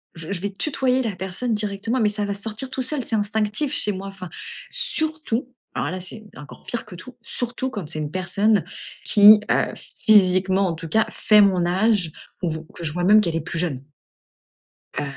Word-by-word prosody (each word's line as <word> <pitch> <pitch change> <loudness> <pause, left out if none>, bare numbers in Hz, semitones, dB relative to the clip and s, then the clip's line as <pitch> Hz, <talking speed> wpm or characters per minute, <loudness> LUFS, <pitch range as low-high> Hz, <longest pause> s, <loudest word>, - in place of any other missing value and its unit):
Je 165 +2 -4
je 185 -3 -2
vais 200 - -3
tutoyer 260 +3 0
la 225 -6 -3
personne 190 +6 -3
directement, 210 +3 -2
mais 215 -3 +3
ça 205 0 -1
va 200 - -2
sortir 215 +5 -4
tout 265 - -3
seul, 265 +2 0
c'est 225 - -2
instinctif 215 +6 0
chez 210 - +3
moi, 195 0 -6
enfin, 190 -2 -8 0.4
surtout, 315 - -1 0.2
alors 145 - -2
là 185 - -4
c'est 190 +4 -6
encore 145 - -12
pire 235 - -4
que 180 - -11
tout, 230 +8 -12
surtout 245 +2 -4
quand 205 - -6
c'est 155 0 -5
une 150 -1 -4
personne 200 +4 +1 0.4
qui, 210 0 +8
heu, - - +1
physiquement 190 -2 +3
en 175 - -1
tout 165 0 -8
cas, 220 +6 +3
fait 210 -1 +4
mon 185 -3 +3
âge 190 -1 +1 0.3
ou 175 - 0
v 160 0 -3
que 175 - -9
je 155 - -1
vois 175 +3 -3
même 210 +4 +6
qu'elle 170 -5 -2
est 165 - -1
plus 165 +2 -4
jeune. 140 -7 -2 1.1
Heu, - - -2
205 Hz, 200 wpm, -22 LUFS, 180-225 Hz, 1.1 s, qui